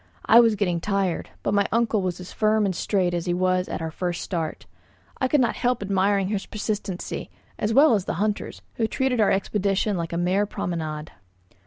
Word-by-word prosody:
I 230 - +7
was 230 -2 +5
getting 180 -5 0
tired; 195 -3 -1
but - - 0
my 200 -1 +3
uncle 230 -2 +2
was 185 -1 -2
as 180 - -9
firm 215 0 +2
and 190 -2 -1
straight 185 -1 0
as 175 0 -2
he 175 - +1
was 185 0 +1
at - - -4
our 160 - -3
first 175 +1 -3
start. 165 -4 -4 0.5
I 260 - +2
could 295 +3 +3
not 240 - +1
help 245 -3 0
admiring 195 0 +1
his 205 -2 -2
persistency, 205 -3 -4 0.3
as 210 - 0
well 280 +4 +6
as 200 -4 +1
the - - -2
hunter's, 210 +3 -2
who 225 - +1
treated 250 0 0
our 210 - +4
expedition 200 0 0
like 165 -1 -3
a 170 - -2
mere 185 +4 +1
promenade. 155 -5 -4
195 Hz, 200 wpm, -24 LUFS, 180-215 Hz, 0.5 s, I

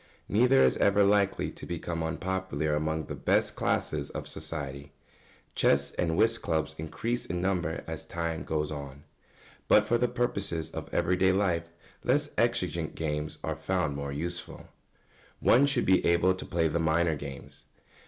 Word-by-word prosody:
Neither 125 +5 +4
is - - +3
ever 100 0 +4
likely 100 0 +2
to - - -10
become 85 -1 -3
unpopular 80 -3 -2
among 80 +1 -1
the - - -6
best - - +1
classes - - -1
of - - -6
society. 70 -2 -5 0.6
Chess 70 0 +3
and 80 -2 -1
whist 115 0 +3
clubs 80 -2 -1
increase 115 +10 -3
in 90 +1 -2
number 90 -3 -1
as - - -6
time 85 -1 -3
goes 75 -1 -2
on; 70 -1 -7 0.6
but 105 - +6
for 120 +1 +2
the 125 - +3
purposes 100 -10 -1
of - - -7
everyday 90 +2 +2
life 90 -4 0 0.3
less - - +1
exigent - - 0
games 75 -1 -3
are - - -2
found 90 -6 -1
more 70 0 -4
useful. 85 +4 -4
[Sidenote: - - -14 0.7
One 130 +4 +5
should 140 -4 +2
be 95 0 +4
able 85 +2 +3
to 95 - -7
play 85 -3 +1
the 80 +2 -1
minor 80 0 +2
games. 70 -2 -9
85 Hz, 160 wpm, -29 LUFS, 75-95 Hz, 0.7 s, but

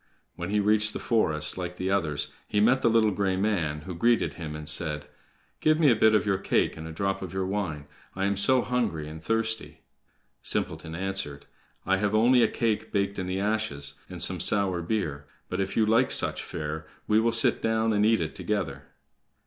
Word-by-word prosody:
When 85 +1 -5
he 105 +1 +1
reached 105 +1 +2
the - - -4
forest, 80 -8 0
like 90 0 -4
the 95 +1 -2
others, 80 -7 -1
he 105 - 0
met 120 +5 +4
the 115 - +4
little 110 -2 +3
gray 95 -1 0
man, 90 -7 -1
who 90 +4 -7
greeted 115 +7 +2
him, 80 -3 -6
and 75 0 -8
said: 75 -1 -1 0.5
"Give 155 0 +3
me 150 -5 +6
a - - +4
bit 110 0 +4
of 105 - +2
your 95 -2 +1
cake - - +1
and 80 0 -8
a - - -7
drop 95 +4 -2
of 95 -2 -6
your 95 0 0
wine. 95 -7 -3 0.3
I 95 +1 -1
am 100 0 +1
so 125 +6 +3
hungry 110 -12 -1
and 80 +1 -9
thirsty." 110 +2 -1 0.6
Simpleton 80 0 -2
answered: 95 -6 -3 0.4
"I 95 +1 +2
have 105 +1 0
only 120 +3 +5
a - - +5
cake 115 -3 -1
baked 100 0 -1
in 90 - -3
the 95 +1 -2
ashes, 100 -10 -1
and - - -8
some - - +1
sour 95 -4 +2
beer; 80 -7 -3 0.2
but, - - -3
if 95 0 -2
you 110 - +4
like 115 +4 +3
such - - +1
fare, 75 +1 -5 0.2
we 105 0 +3
will 115 +1 +2
sit 115 0 +2
down 110 0 +1
and 105 0 +2
eat 110 -2 +3
it 80 -1 -3
together." - - -3
100 Hz, 205 wpm, -27 LUFS, 80-110 Hz, 0.6 s, me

